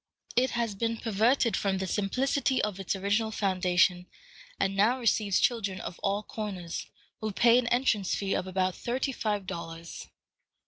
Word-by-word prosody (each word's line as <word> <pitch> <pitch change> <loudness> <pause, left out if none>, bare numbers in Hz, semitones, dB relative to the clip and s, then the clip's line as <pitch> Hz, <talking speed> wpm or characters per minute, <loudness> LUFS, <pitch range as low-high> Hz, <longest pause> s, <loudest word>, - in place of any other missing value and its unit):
It 255 +2 +3
has 230 -3 0
been 230 +3 -1
perverted 230 +2 +2
from 195 -1 0
the 190 - -2
simplicity 255 +8 0
of 205 -2 -2
its 195 0 -1
original 205 +3 0
foundation, 180 -3 +2 0.5
and 195 0 +1
now 220 +6 +3
receives 215 -5 +2
children 200 -6 0
of 180 - -7
all 200 +1 0
comers, 195 -6 -5 0.3
who 215 -1 -2
pay 235 +5 +5
an 245 - -2
entrance 240 -6 +1
fee 195 -1 -1
of 185 - -1
about 185 0 0
thirty 255 +8 -2
five 210 -5 -2
dollars. 165 -1 -7
205 Hz, 155 wpm, -29 LUFS, 190-230 Hz, 0.5 s, pay